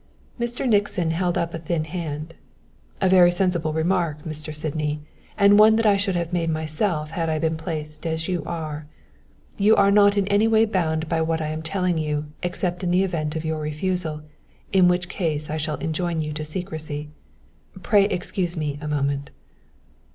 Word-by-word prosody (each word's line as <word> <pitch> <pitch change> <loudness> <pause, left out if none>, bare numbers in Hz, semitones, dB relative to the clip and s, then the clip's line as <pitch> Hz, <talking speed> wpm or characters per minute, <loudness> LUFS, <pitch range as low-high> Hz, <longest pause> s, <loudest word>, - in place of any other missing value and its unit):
Mr. 240 +2 -1
Nixon 205 -6 +2
held 175 +1 0
up 170 0 -1
a 165 - -4
thin 160 0 -1
hand. 160 -1 -5 0.7
"A - - +2
very 180 -1 +6
sensible 175 -3 0
remark, 160 -2 0
Mr. 155 -1 -3
Sydney, 150 0 -2 0.4
and 200 0 +6
one 220 +1 +7
that 225 0 +1
I 205 -2 +5
should 195 -1 0
have 170 0 -2
made 170 -2 0
myself 155 0 -1
had 165 -1 -1
I 155 - 0
been 160 +1 0
placed 160 0 -5
as 160 0 -2
you 180 -3 -1
are. 155 -3 -5 0.7
You 210 +2 +5
are 200 0 +4
not 205 0 +5
in 195 -1 +2
any 205 +2 +4
way 225 0 +4
bound 165 -6 -1
by 165 0 0
what 160 0 0
I 155 -1 -2
am 155 +1 -4
telling 180 0 0
you 150 -1 -1 0.2
except 180 +1 -2
in 180 - 0
the 180 +2 +3
event 160 -5 -2
of 160 0 -3
your 160 0 -1
refusal; 155 0 -2 0.5
in 185 -2 +6
which 180 0 +1
case 155 -5 -2
I 155 - -1
shall 155 0 -2
enjoin 165 +1 -2
you 150 0 -4
to 155 +1 -4
secrecy. 155 -3 -5 0.7
Pray 200 +2 +4
excuse 180 -2 -2
me 145 -2 -2
a 150 - -5
moment." 140 -1 -1
165 Hz, 185 wpm, -23 LUFS, 155-185 Hz, 0.7 s, one